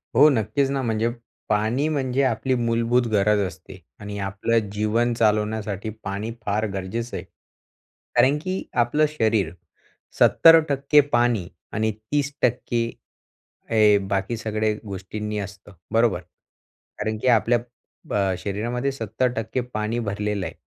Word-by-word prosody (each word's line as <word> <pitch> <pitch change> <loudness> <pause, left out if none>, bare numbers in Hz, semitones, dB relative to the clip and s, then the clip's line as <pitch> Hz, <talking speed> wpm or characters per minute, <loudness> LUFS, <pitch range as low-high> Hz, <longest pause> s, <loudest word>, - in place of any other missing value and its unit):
हो, 150 +4 +8
नक्कीच 130 +3 +1
ना, 135 -1 -1
म्हणजे 115 -1 0 0.4
पाणी 110 +8 +1
म्हणजे 135 -2 0
आपली 130 +1 +1
मूलभूत 115 +1 +1
गरज 105 0 +3
असते 95 0 -12 0.2
आणि 105 0 -6
आपलं 100 +3 0
जीवन 110 +3 +1
चालवण्यासाठी 105 -2 0
पाणी 100 +4 -3
फार 105 +2 0
गरजेचं 110 +6 -4
आहे. - - -6 0.9
कारण 140 +3 +4
की 185 +2 -3 0.2
आपलं 150 +6 +2
शरीर 110 - +1 0.7
70% 150 -3 +6
पाणी 120 -6 +2 0.3
आणि 110 +1 +1
30% 120 0 -1 0.9
हे 105 -2 +5
बाकी 100 +4 -1
सगळ्या 110 -1 -1
गोष्टींनी 105 +2 -5
असतं, 100 0 -8 0.2
बरोबर? 115 -6 +3 0.8
कारण 110 +1 -2
की - - -1
आपल्या 120 0 +4 0.5
अ, 95 -2 +1
शरीरामध्ये 120 +7 -2
70% 115 0 -2
पाणी 110 +2 -1
भरलेलं 105 -2 -2
आहे, - - -5
110 Hz, 120 wpm, -23 LUFS, 105-125 Hz, 0.9 s, हो